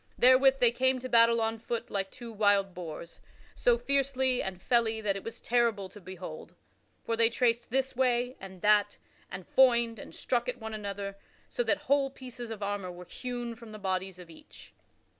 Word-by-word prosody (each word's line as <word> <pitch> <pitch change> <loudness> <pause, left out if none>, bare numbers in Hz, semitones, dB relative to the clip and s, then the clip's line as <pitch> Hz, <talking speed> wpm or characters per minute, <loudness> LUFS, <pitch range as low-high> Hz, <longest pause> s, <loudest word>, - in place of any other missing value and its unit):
Therewith 265 +2 +6
they 240 -2 +5
came 260 +2 +2
to 255 0 -6
battle 230 -1 +5
on 225 0 -1
foot 230 +1 -4
like 195 -1 -2
two 240 0 -10
wild 205 -2 +2
boars 170 -1 -8 0.3
so 485 -1 +3
fiercely 265 - +1
and 190 -2 -5
felly 225 0 +1
that 205 -3 0
it 195 - -6
was 230 - -7
terrible 230 -5 +1
to 205 - -13
behold. 180 -3 -9 0.5
For 230 - 0
they 230 0 +4
traced 235 0 +1
this 265 +2 0
way 250 0 +1
and 190 -2 -11
that 205 -1 +3 0.3
and 185 -1 -7
foined 235 -4 +4
and - - -10
struck 245 0 -1
at 250 - -3
one 220 -1 -6
another 200 -1 -5 0.3
so - - -2
that - - 0
whole 280 -1 +3
pieces 250 -3 -9
of 215 -2 -6
armor 200 -2 -3
were 180 0 -10
hewn 245 +2 -5
from 230 -1 -12
the - - -7
bodies 190 -2 -3
of 175 -2 -12
each. 160 - -15
230 Hz, 190 wpm, -30 LUFS, 195-250 Hz, 0.5 s, Therewith